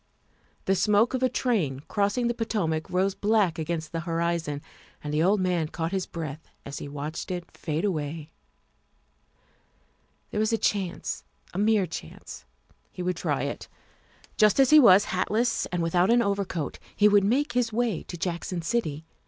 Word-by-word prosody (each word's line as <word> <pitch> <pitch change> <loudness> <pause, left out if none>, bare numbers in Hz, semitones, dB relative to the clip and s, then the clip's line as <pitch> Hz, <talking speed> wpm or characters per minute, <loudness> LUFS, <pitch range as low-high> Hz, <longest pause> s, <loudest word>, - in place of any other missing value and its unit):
The 190 - +3
smoke 210 +5 +3
of 260 - -1
a 255 - +3
train 175 - 0
cross 200 +6 -1
ing 245 - +1
the 235 - +1
Potomac 190 -9 -2
rose 190 +2 +1
black 205 -6 +1
against 160 0 -3
the 165 - -2
horizon, 165 -3 -2 0.4
and 150 0 -4
the 150 - +2
old 195 +5 +3
man 180 -4 +1
caught 165 +1 -3
his 190 -2 -2
breath 160 -2 -7 0.2
as 140 0 -6
he - - -6
watched 150 +5 -5
it 175 -2 -5
fade 160 +3 -2
away. 155 -3 -3 2.0
There 210 - -2
was 215 +1 +2
a 225 - +2
chance, 195 -5 -2 0.3
a 180 - -3
mere 210 -2 +3
chance. 150 - -9 0.5
He 180 - -6
would 180 -1 -1
try - - -1
it. - - -4 0.7
Just 215 +3 +4
as 270 0 +5
he 305 - +9
was, 205 -6 +7
hatless 220 +6 +1
and 175 -1 -2
without 175 +3 +2
an 235 0 +5
overcoat, 200 -6 -2 0.2
he 210 - +5
would 205 -1 +5
make 275 +9 +1
his 245 -2 +1
way 225 -5 0
to 175 - -8
Jackson 170 0 -3
City. 160 -7 -2
185 Hz, 170 wpm, -27 LUFS, 165-215 Hz, 2.0 s, he